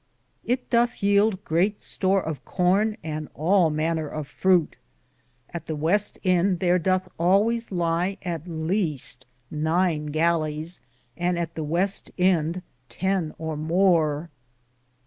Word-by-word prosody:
It 250 +1 -2
dothe 235 0 +3
yelde 200 0 +3
greate 190 +6 +1
store 190 0 +1
of 155 -3 -5
corne 195 +4 +1
and 155 -1 -5
all 175 +2 +3
maner 155 +1 -1
of 150 -1 -5
frute. 180 -2 +2 0.7
At 170 - -7
the 155 - -2
weste 175 +8 +1
End 185 -1 +2
Thare 180 0 +3
Dothe 185 +2 +1
alwayes 210 +7 +2
ly 175 +2 0
at 170 -3 -4
the - - -10
leaste 160 -2 -2 0.3
nyne 160 0 0
gallies, 160 0 0 0.3
and 175 +1 0
at 165 -1 -3
the 160 - -4
weste 175 +6 0
end 180 -1 +1 0.3
ten 190 -4 -1
or 160 -1 -4
more. 160 -1 +1
175 Hz, 130 wpm, -25 LUFS, 160-190 Hz, 0.7 s, dothe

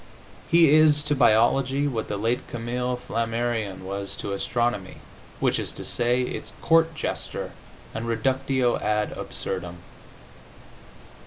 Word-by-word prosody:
He 165 -3 +6
is 155 -1 +5
to 145 0 +1
biology 130 +4 +3
what 115 -6 -2
the 105 - -3
late 115 +5 -1
Camille 125 +1 -2
Flammarion 115 -4 -2
was 100 +1 -5
to 100 - -4
astronomy, 110 -1 -1 0.4
which - - +1
is - - -2
to - - -6
say, 120 +1 +1
its - - -5
court 165 0 +3
jester - - -4 0.4
and 115 +1 -4
reductio 130 +2 +1
ad 105 0 0
absurdum. 90 -2 -5
120 Hz, 120 wpm, -25 LUFS, 110-135 Hz, 0.4 s, He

